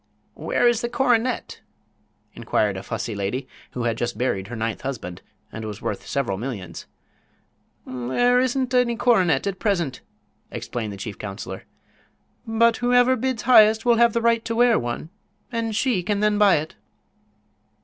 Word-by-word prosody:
"Where 245 - +1
is 240 -1 +2
the 235 - -2
coronet?" 245 -1 0 0.7
inquired 105 -2 0
a 95 - -5
fussy 115 - -4
old 100 - -6
lady 125 +7 -3 0.3
who 125 - -3
had 115 -1 -1
just 120 -2 -2
buried 100 -6 -1
her 120 - -7
ninth 110 -1 -3
husband 90 -10 -6 0.3
and 110 - -7
was 105 -1 -6
worth - - -5
several 115 -9 -2
millions. 100 -9 -6 1.0
"There 130 - +1
isn't 255 0 0
any 250 -2 +3
coronet 185 - +2
at 195 -2 -3
present," 175 - -1 0.5
explained 110 -4 -5
the 100 - -8
chief 100 +1 -7
counselor, 100 -2 -7 0.8
"but 225 +1 +3
whoever 245 +1 +3
bids 255 -2 -2
highest 220 -2 +6
will 240 -1 +4
have 235 -1 +4
the 235 - 0
right 230 -1 +3
to 230 - -2
wear 240 -1 +4
one, 120 +7 -5 0.4
and 230 -2 -2
she 230 -4 +1
can 200 +3 -1
then 210 0 +2
buy 205 -3 +6
it." 155 +1 -3
205 Hz, 160 wpm, -23 LUFS, -, 1.0 s, highest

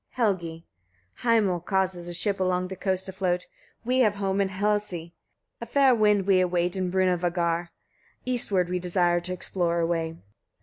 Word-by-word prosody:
Helgi. 170 -8 -1 0.5
5. - - -14 0.2
Hamal 180 -3 0
causes 185 -1 -1
a - - -5
ship 200 +3 -1
along 185 0 0
the 190 - -5
coasts 190 0 -1
to 190 - -6
float; 180 -2 -1 0.4
we 255 +2 +1
have 215 -5 +3
home 195 0 0
in 195 - 0
Hlesey; 190 -4 -2 0.5
a 235 - -5
fair 270 +1 +4
wind 210 -4 +3
we 190 -2 +4
await 175 0 0
in 185 -1 -1
Brunavagar; 175 -2 0 0.6
eastward 210 -8 +2
we 180 0 -2
desire 175 -1 +1
to 175 +1 -6
explore 175 -1 -1
a 165 - +2
way. 165 -1 -2
185 Hz, 170 wpm, -26 LUFS, 175-200 Hz, 0.6 s, fair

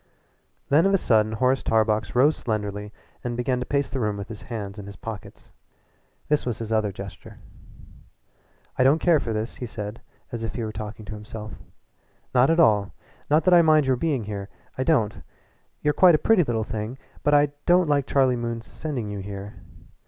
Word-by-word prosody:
Then 160 +6 +5
of 195 - +3
a - - +5
sudden 110 - +2
Horace 130 +3 +2
Tarbox 110 0 +1
rose 145 +5 +5
slenderly 105 -2 -3 0.3
and 120 -1 -3
began 125 +1 0
to 125 - -4
pace 140 -1 0
the 135 - -4
room 105 -3 -1
with 100 +1 -7
his 110 -3 -8
hands 105 -3 -6
in 100 - -8
his 100 - -9
pockets. 110 -2 -9 0.8
This 150 -1 +1
was 120 -3 -3
his 115 -1 -6
other 110 -2 +1
gesture. 100 0 -10 1.4
"I - - +6
don't 135 +4 +5
care 165 -2 +3
for 120 -3 -3
this," 110 +2 -3
he 125 - -5
said 105 0 -7 0.3
as 120 - -4
if 115 - -4
he 120 - -3
were 110 - -3
talking 110 0 -7
to 105 - -7
himself 105 0 -8 0.8
"at 135 +7 +4
all. 105 -10 +3 0.3
Not 155 +2 +4
that 185 - +5
I 175 - +8
mind 155 -3 +4
your 130 -1 +2
being 135 -2 -1
here 100 -1 -6 0.3
I 130 - -1
don't. 125 -9 +1 0.6
You're 150 - +3
quite 180 -1 +6
a - - -3
pretty 225 -6 +5
little 115 -5 -1
thing, 110 +3 -5 0.2
but 145 0 +3
I 145 0 +4 0.2
don't 180 0 +5
like 140 -2 +1
Charlie 130 -2 +3
Moon's 115 -1 -4
sending 140 -8 -5
you 100 - -5
up 95 - -7
here. 100 0 -7
115 Hz, 195 wpm, -24 LUFS, 105-140 Hz, 1.4 s, I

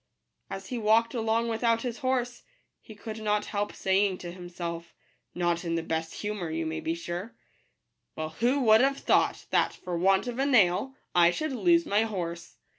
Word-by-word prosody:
As 195 0 -6
he 245 - -3
walked 225 +2 +3
along 230 0 0
without 230 0 +1
his 240 -2 -4
horse, 255 -3 -1 0.4
he 220 - -13
could 220 +1 -7
not 210 -1 0
help 205 0 -1
saying 190 0 +1
to 175 -1 -8
Kimself, 170 -2 -7 0.4
not 175 -1 0
in 165 -1 -1
the 165 - -1
best 160 0 -3
humour, 205 -5 -4
you 160 +1 -2
may 160 0 -3
be 165 +1 -2
sure: 175 +6 -6 0.4
" - - -53
Well, 155 0 -3
who 245 - +1
would 220 -2 +6
have 275 +1 +2
thought - - +1
that, - - +2
for 180 -1 -5
want 190 +4 +3
of 245 0 -5
a 270 - +2
nail, 215 0 +3 0.2
I 170 -1 +6
should 310 - -2
lose 335 +5 +3
my 205 -3 +2
horse 175 -6 -4
205 Hz, 190 wpm, -28 LUFS, 175-235 Hz, 0.4 s, would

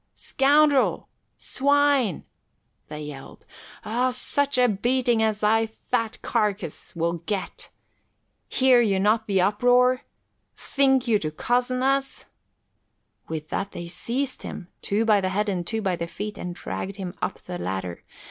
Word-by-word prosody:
Scoundrel! 285 0 +3 0.3
Swine!" 280 - +2 0.6
they 150 0 -7
yelled. 150 -2 -9 0.4
"Oh, 245 +4 +1
such 280 +2 -1
a 250 0 +5
beating 240 +2 +1
as 215 -1 0
thy 225 +1 +3
fat 225 +1 -3
carcase 210 -9 -2
will 170 0 -1
get. 200 -3 -4 0.8
Hear 255 -2 +5
you 200 -4 +2
not 220 +3 +2
the 195 -3 +2
uproar? 245 +6 +3 0.6
Think 265 -2 +2
you 220 -3 +3
to 155 - -2
cozzen 245 +9 0
us?" 270 0 0 1.0
With 155 -1 -5
that 200 0 -3
they 175 0 -6
seized 245 +10 -3
him, 180 - -8
two 210 +3 0
by 210 -3 +4
the 185 - 0
head 205 +3 0
and 175 -3 -2
two 225 -1 -2
by 190 -3 +1
the 170 0 -4
feet, 205 +5 -6
and 175 -1 -6
dragged 195 +2 -5
him 185 -3 -6
to 195 - -4
the 180 -1 -5
ladder. 95 - -4
215 Hz, 145 wpm, -25 LUFS, 185-255 Hz, 1.0 s, a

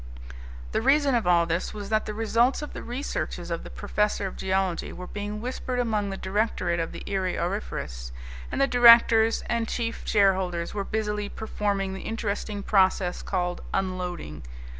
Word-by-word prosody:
The - - 0
reason 275 +2 +4
of 230 -6 +1
all 170 -1 +5
this 170 +5 -2
was 205 -1 -6
that 215 0 +1
the 210 - -3
results 230 +5 +2
of 295 - -7
the - - -6
researches 250 +4 -4
of - - -2
the - - -9
professor 210 -1 -1
of 190 - -5
geology 190 -2 -1
were 180 - -8
being 205 +2 -5
whispered 255 +1 -3
among 215 -4 0
the 195 - -4
directorate 190 -3 0
of 165 - -2
the - - -8
Erie 190 -2 -1
Auriferous. 115 - -4 0.4
And - - -2
the 275 - +5
directors 235 -3 +6
and 230 -1 -1
chief 230 -1 -2
shareholders 190 -4 +2
were 205 -1 -2
busily 210 -1 -2
performing 200 -3 -2
the 190 - -6
interesting 210 -2 -3
process 190 -3 +2
called 180 -2 -2
unloading. 180 - -3
205 Hz, 165 wpm, -26 LUFS, 185-225 Hz, 0.4 s, directors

